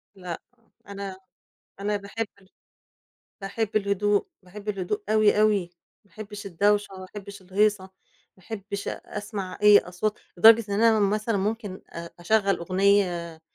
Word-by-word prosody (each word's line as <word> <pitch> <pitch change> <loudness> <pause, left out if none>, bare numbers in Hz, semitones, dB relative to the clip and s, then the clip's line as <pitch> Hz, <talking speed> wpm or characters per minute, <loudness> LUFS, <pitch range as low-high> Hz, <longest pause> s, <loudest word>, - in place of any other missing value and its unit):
لأ، 180 -3 -6 0.5
أنا، 200 -1 -6 0.6
أنا 205 +1 0
باحب 205 +3 -4
ال 190 - -23 0.9
باحب 215 +2 -3
الهدوء. 205 - +1 0.2
باحب 205 +3 -8
الهدوء 195 0 -2
أوي، 215 -1 +4
أوي. 205 -5 +2 0.4
ما 200 - -29
أحبّش 205 +1 -8
الدوشة، 205 +3 +2
ما 185 - -8
أحبّش 200 0 -10
الهيصة، 205 +1 +1 0.5
ما 185 - -21
أحّبش 200 -2 -6
أ - - -4 0.2
أسمع 200 -3 -5
أي 210 -1 +9
أصوات 185 +4 -3 0.2
لدرجة 225 +4 +8
إن 200 +2 0
أنا 225 -2 +5
مثلًا 210 +1 +1
ممكن 205 -1 -3
أ 170 0 -7
أشَغَّل 200 +2 +2
أغنية 180 -2 +1
200 Hz, 135 wpm, -26 LUFS, 190-210 Hz, 0.9 s, أي